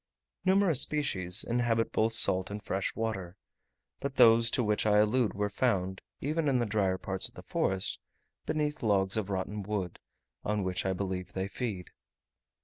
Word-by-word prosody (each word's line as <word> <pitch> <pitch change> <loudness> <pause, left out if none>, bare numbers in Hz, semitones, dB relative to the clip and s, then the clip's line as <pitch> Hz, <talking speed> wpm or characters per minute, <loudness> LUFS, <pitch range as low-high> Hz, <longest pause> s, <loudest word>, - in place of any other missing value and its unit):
Numerous 190 -6 +4
species 95 -13 +1
inhabit 115 -1 +1
both 110 +1 +1
salt 95 -4 +4
and 105 +1 -6
fresh 95 +1 -2
water; 100 -5 -4 0.6
but 140 -1 -4
those 115 0 +6
to 125 - 0
which 105 0 +1
I 105 0 +4
allude 105 0 +2
were 105 +1 0
found, 100 -3 -1 0.2
even 155 +2 -1
in 135 -2 +3
the 120 - +1
drier 100 -3 0
parts 95 0 -4
of - - -18
the - - -10
forest, 95 0 -1 0.5
beneath 150 0 -1
logs 100 -3 +2
of 105 -3 -2
rotten 100 +2 -3
wood, 100 -3 -4 0.4
on 105 -1 -1
which 95 0 -2
I 95 - +1
believe 95 -1 -4
they 95 0 -2
feed. 100 -4 -5
105 Hz, 165 wpm, -30 LUFS, 95-120 Hz, 0.6 s, those